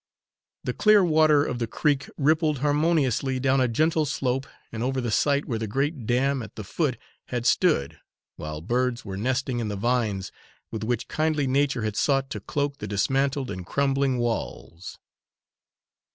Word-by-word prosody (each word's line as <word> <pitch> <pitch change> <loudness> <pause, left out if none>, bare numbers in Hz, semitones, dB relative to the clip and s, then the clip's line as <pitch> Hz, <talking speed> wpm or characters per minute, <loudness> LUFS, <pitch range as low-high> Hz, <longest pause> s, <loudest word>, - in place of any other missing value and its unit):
The - - -2
clear 210 -3 +5
water 155 -3 +4
of 120 - -3
the 115 - -1
creek 140 +4 0
rippled 155 +1 +2
harmoniously 145 -3 +1
down 135 0 +2
a 130 - +3
gentle 155 +5 +1
slope 130 -1 -1 0.2
and 110 - -5
over 130 +2 0
the 120 -3 -2
site 140 +5 +2
where 115 -4 -3
the 110 - -3
great 135 +2 -2
dam 135 +2 +1
at 110 -3 -10
the 110 - -6
foot 130 - -1 0.3
had 120 -1 -4
stood, 70 - +2 0.4
while 75 0 -6
birds 120 +5 -1
were 95 -2 -5
nesting 130 +4 -1
in 115 - -2
the 105 - -3
vines 105 -3 -1 0.4
with 110 -1 -4
which 120 +1 -2
kindly 155 -2 0
nature 135 -2 +1
had 110 -1 -2
sought 135 +2 +1
to - - -4
cloak 140 -1 -2
the 105 - -5
dismantled 135 +6 0
and 90 -1 -7
crumbling 135 -2 +1
walls. 95 - -4
130 Hz, 165 wpm, -25 LUFS, 115-145 Hz, 0.4 s, clear